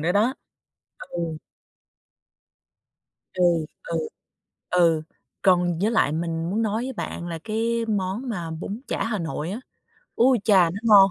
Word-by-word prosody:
nữa 175 +2 +2
đó. 225 +6 +3 0.7
Ừ. 170 -2 -4 2.0
Ừ, 180 - +1 0.4
ừ, - - -2 0.7
ừ. 165 -3 +3 0.4
Còn 175 -3 +3
với 215 +3 +2
lại 215 -10 +3
mình 165 +1 -2
muốn 215 +4 0
nói 220 +2 0
với 260 0 -4
bạn 175 -5 -5
là 165 -1 -4
cái 230 +1 0
món 210 +4 -1
mà 170 -6 -3
bún 195 +8 -5
chả - - -1
Hà 215 -3 -1
Nội 160 +1 -3
á, 220 - -4 0.6
ui 250 +1 +5
chà, 185 -6 +5
nó 200 +4 -5
ngon! 200 -3 +8
195 Hz, 145 wpm, -24 LUFS, 170-225 Hz, 2.0 s, ngon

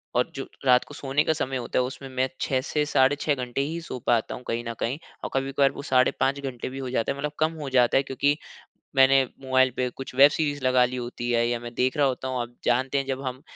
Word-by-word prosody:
और 125 - +1
जो 135 - -5 0.2
रात 125 -1 +5
को 145 - -12
सोने 140 +1 0
का 160 - +2
समय 135 -4 -2
होता 120 +1 -1
है - - +3
उसमें 135 +1 -7
मैं 130 +1 +1
6 130 -1 +1
से 150 +2 -1
साढ़े 135 -1 +3
6 145 -2 +1
घंटे 125 +1 -3
ही 160 +4 -2
सो 130 -6 -6
पाता 115 -2 +2
हूँ 125 - -10
कहीं 115 +1 -2
न 115 - -3
कहीं। 130 +6 -2 0.2
और - - -3
कभी-कभार 135 +1 +2
वो - - -8
साढ़े 130 -1 +5
5 140 +1 +1
घंटे 130 -4 -5
भी 135 - -8
हो 130 -2 -4
जाता 115 -3 0
है, 140 - -5
मतलब 145 +1 -3
कम 155 +1 +2
हो 140 - -4
जाता 125 -1 +4
है। 135 - +3
क्योंकि 140 +2 +1 0.6
मैंने 135 0 +6 0.2
मोबाइल 130 0 +3
पे 125 -1 0
कुछ 135 +2 -9
वेब 140 +2 +8
सीरीज़ 145 -3 -1
लगा 130 -1 +5
ली 125 - -4
होती 120 0 -4
है 120 0 +2
या 120 -1 -1
मैं 120 0 -8
देख 130 +2 +1
रहा 145 - +4
होता 130 0 -3
हूँ। 130 -1 -1
आप 120 +1 -7
जानते 130 +3 +1
हैं 135 - 0
जब 135 0 -3
हम 130 +1 -5
130 Hz, 265 wpm, -25 LUFS, 125-140 Hz, 0.6 s, वेब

